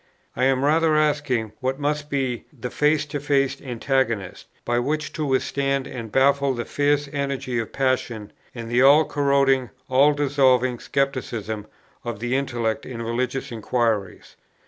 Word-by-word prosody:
I 130 - +1
am 135 0 +2
rather 160 +1 +3
asking 145 -7 +1
what 130 +2 -2
must 150 0 -2
be 130 -4 -2
the 125 -4 -7
face 150 0 +2
to 145 0 -4
face 140 -1 0
antagonist, 120 -5 -2 0.2
by 120 0 +1
which 150 +4 -2
to 155 - -3
withstand 135 0 0
and 115 -4 -7
baffle 140 +1 +3
the 120 - -4
fierce 145 0 +1
energy 140 -3 -2
of 115 - -4
passion 125 -5 -1 0.2
and 115 -1 -6
the 120 +2 +2
all 145 +4 +7
corroding, 140 -3 +2 0.2
all 140 +3 +5
dissolving 130 -4 +2
scepticism 120 -6 -2 0.4
of 120 -3 -5
the 120 +3 -1
intellect 120 -5 -1
in 115 -3 -6
religious 125 +4 -2
inquiries? 110 -4 -2
130 Hz, 145 wpm, -23 LUFS, 120-140 Hz, 0.4 s, all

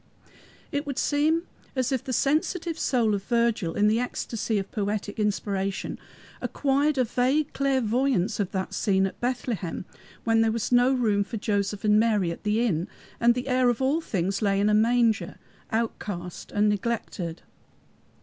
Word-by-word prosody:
It 285 +1 -2
would 280 -2 -4
seem 310 +3 +2 0.3
as 260 0 0
if 260 -2 0
the 265 - -5
sensitive 320 +5 0
soul 230 -5 +2
of 200 - -1
Virgil, 235 -8 +1
in 205 0 +3
the 220 +2 +3
ecstasy 230 -3 -2
of 195 -1 -3
poetic 205 0 -3
inspiration, 200 -2 -1 0.4
acquired 285 +1 +1
a 255 - +4
vague 260 +6 +1
clairvoyance 255 -5 +1
of 200 -2 -1
that 190 -1 -3
scene 195 -2 +2
at 190 - -5
Bethlehem 240 -8 -2 0.4
when 225 -1 +3
there 225 0 +3
was 230 +1 -2
no 245 +1 +5
room 220 -6 +2
for 225 +3 -6
Joseph 205 -1 -1
and 210 0 +5
Mary 210 -6 +2
at 170 - -7
the 210 +2 +1
inn, 175 -5 0 0.3
and 235 0 +4
the 250 +1 -3
Heir 255 -1 +3
of 240 - 0
all 275 +5 +1
things 195 - -1
lay 200 -2 +2
in 205 +1 +3
a - - +3
manger, 230 +1 +2 0.4
outcast 205 -6 -3
and 205 +1 +2
neglected. 205 -5 -2
225 Hz, 165 wpm, -26 LUFS, 205-255 Hz, 0.4 s, no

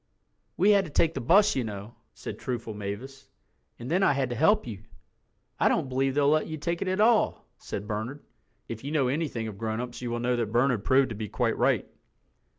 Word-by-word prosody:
"We 200 +4 +5
had 200 -1 +5
to - - -8
take 160 +2 +2
the 135 - -4
bus, 200 - +4
you 130 - 0
know," 105 0 -7 0.2
said - - -7
truthful 115 -3 -4
Mavis, 115 +7 -7 0.5
"and 120 +4 -7
then 180 +3 +2
I 195 - +4
had 135 -2 -1
to - - -2
help 160 - +3
you." 105 -5 -7 0.8
"I - - +4
don't 130 - 0
believe 135 +1 0
they'll 145 -1 +3
let 155 +1 +3
you 155 - -5
take 170 +3 -3
it 195 - -2
at 185 +2 -1
all," 220 +1 +3
said 100 - -6
Bernard—if 110 - -8
you 140 - -4
know 140 -5 +2
anything 135 -6 -2
of 100 -2 -8
grown 110 0 -2
ups 125 0 -6
you 120 - -3
will 120 0 -2
know 125 +1 +1
that 115 -3 -2
Bernard 120 -2 +2
proved 130 +2 +3
to 115 - -5
be 105 0 -5
quite - - 0
right. - - +1
130 Hz, 220 wpm, -27 LUFS, 115-155 Hz, 0.8 s, We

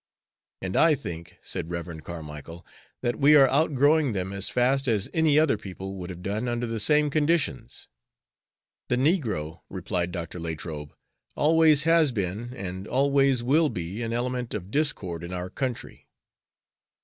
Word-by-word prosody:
"And 95 0 -3
I 165 -2 +5
think," 85 - -8
said 80 - -5
Rev. 85 -2 -5
Carmicle, 80 0 -9 0.4
"that 120 - 0
we 150 +2 +6
are 135 -2 +7
outgrowing 145 -1 +3
them 95 0 -3
as 100 0 0
fast 135 +2 +1
as 105 -5 +1
any 160 -2 +3
other 155 -8 +3
people 95 -1 -7
would 90 -2 -7
have 90 -1 -8
done 105 +5 -2
under 120 0 -1
the 115 -1 -3
same 150 +6 +3
conditions." 145 -5 -1 1.0
"The 125 - +3
negro," 115 - 0
replied 90 -1 -2
Dr. 85 -1 -6
Latrobe, 80 -2 -6 0.4
"always 155 -1 +4
has 165 -3 +4
been 105 +2 -3
and 95 -3 -6
always 135 -1 +2
will 150 +5 +3
be 90 +4 -5
an 115 -1 -3
element 125 0 -2
of 95 -1 -6
discord 100 - -1
in 85 +1 -6
our 90 0 -5
country." 130 -3 -5
115 Hz, 150 wpm, -26 LUFS, 90-140 Hz, 1.0 s, are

